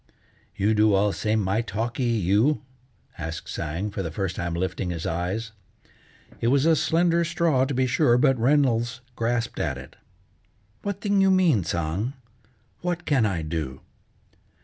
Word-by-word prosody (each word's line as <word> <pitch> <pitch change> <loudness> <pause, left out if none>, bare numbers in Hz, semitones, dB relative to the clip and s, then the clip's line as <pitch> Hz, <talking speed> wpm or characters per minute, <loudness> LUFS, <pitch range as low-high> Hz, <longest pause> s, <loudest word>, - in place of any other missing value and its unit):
"You 105 +3 +2
do 105 -1 +4
all 100 +1 +3
same 110 0 0
my 100 +3 +1
talkee 115 +3 -3 0.2
you?" 105 - +2 0.6
asked 80 0 -5
Tsang, 85 +8 -3
for 100 - -3
the 85 - -3
first 95 +2 -3
time 85 -1 -3
lifting 95 +1 -2
his 85 -2 -4
eyes. 95 +7 -2 0.9
It 115 - 0
was 135 +3 +3
a 165 -1 +5
slender 170 +3 +2
straw, 165 -6 +2
to 140 - -3
be 130 +1 +2
sure, 125 -1 +3
but 135 +1 +4
Reynolds 125 -1 +2
grasped 115 0 -1
at - - -1
it. - - -12 0.8
"What 200 -1 -4
thing 205 -2 +2
you 195 - +5
mean, 175 - +4
Tsang? 85 - -2 0.7
What 175 0 -2
can 130 -7 +3
I 90 -5 -2
do?" 75 -4 -4
115 Hz, 155 wpm, -25 LUFS, 95-145 Hz, 0.9 s, a